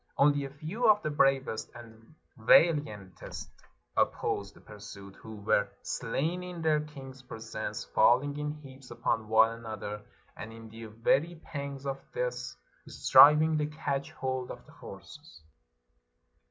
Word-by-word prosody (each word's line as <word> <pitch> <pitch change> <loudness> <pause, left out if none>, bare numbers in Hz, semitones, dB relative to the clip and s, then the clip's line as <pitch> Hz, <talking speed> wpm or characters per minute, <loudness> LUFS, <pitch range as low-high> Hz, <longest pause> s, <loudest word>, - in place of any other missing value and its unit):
Only 145 0 +3
a - - -6
few 160 - -1
of 210 0 +5
the 155 - -1
bravest 135 -5 +1
and 115 +3 -14 0.2
vaKantest 110 - +2 0.5
opposed 100 0 -1
the - - -16
pursuit, 100 -2 -11
who 110 -1 -10
were 105 -1 +1
slain 165 +6 -2
in 180 -2 -7
their 155 -1 +3
king's 135 -3 -10
presence, 110 - -6
falling 130 - +3
in 150 0 -3
heaps 135 -3 -12
upon 110 -1 -1
one 110 +1 +5
another, 105 -2 -6 0.3
and 110 - -8
in 115 0 -11
the 115 +1 -10
very 135 +10 +1
pangs 140 -1 -6
of 135 0 -3 0.2
death - - -3 0.3
striv 150 +2 +7
ing 160 -1 +1
to 150 - 0
catch 145 -2 -3
hold 130 -1 -3
of - - -9
the - - -17
horses. 80 -1 -13
135 Hz, 140 wpm, -30 LUFS, 110-150 Hz, 0.5 s, striv